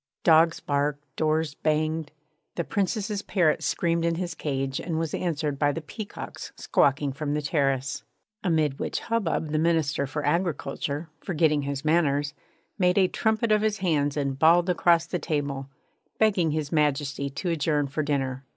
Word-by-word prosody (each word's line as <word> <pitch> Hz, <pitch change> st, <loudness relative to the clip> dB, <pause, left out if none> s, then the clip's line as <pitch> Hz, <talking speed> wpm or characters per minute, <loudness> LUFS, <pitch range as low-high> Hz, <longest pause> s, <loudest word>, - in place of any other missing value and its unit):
Dogs 160 Hz, 0 st, +5 dB
barked, 145 Hz, 0 st, -1 dB
doors 155 Hz, -1 st, 0 dB
banged; 155 Hz, 0 st, -1 dB, 0.4 s
the 170 Hz, -, -1 dB
Princess's 205 Hz, +2 st, -1 dB
parrot 170 Hz, -7 st, +1 dB
screamed 170 Hz, -1 st, 0 dB
in 170 Hz, 0 st, +1 dB
his 175 Hz, 0 st, -3 dB
cage 135 Hz, -3 st, -2 dB
and 165 Hz, -3 st, -3 dB
was 160 Hz, -2 st, -2 dB
answered 150 Hz, -5 st, -2 dB
by 145 Hz, -1 st, +3 dB
the 165 Hz, -, -4 dB
peacocks 200 Hz, +7 st, -8 dB
squawking 140 Hz, 0 st, +1 dB
from 145 Hz, +1 st, -2 dB
the 150 Hz, -, 0 dB
terrace; 135 Hz, -3 st, 0 dB, 0.4 s
amid 155 Hz, -6 st, +1 dB
which -, -, -2 dB
hubbub 200 Hz, -9 st, -1 dB
the 155 Hz, -, +1 dB
Minister 155 Hz, -4 st, +1 dB
for 145 Hz, +1 st, -4 dB
Agriculture, 150 Hz, -2 st, -1 dB
forgetting 155 Hz, -4 st, +1 dB
his 140 Hz, +1 st, -4 dB
manners, 145 Hz, -3 st, +2 dB, 0.5 s
made 180 Hz, 0 st, +3 dB
a 190 Hz, -2 st, +5 dB
trumpet 220 Hz, +3 st, 0 dB
of 210 Hz, -1 st, +4 dB
his 215 Hz, -1 st, +1 dB
hands 150 Hz, -6 st, 0 dB
and 140 Hz, -2 st, -1 dB
bawled 170 Hz, +3 st, +5 dB
across 170 Hz, -1 st, +3 dB
the 180 Hz, +1 st, -3 dB
table, 140 Hz, -4 st, -2 dB, 0.5 s
begging 195 Hz, -7 st, +3 dB
His 150 Hz, -1 st, -2 dB
Majesty 140 Hz, -2 st, 0 dB
to 140 Hz, +6 st, -4 dB
adjourn 150 Hz, -2 st, +1 dB
for 140 Hz, +3 st, -2 dB
dinner. 135 Hz, -3 st, -1 dB
155 Hz, 160 wpm, -26 LUFS, 145-170 Hz, 0.5 s, Dogs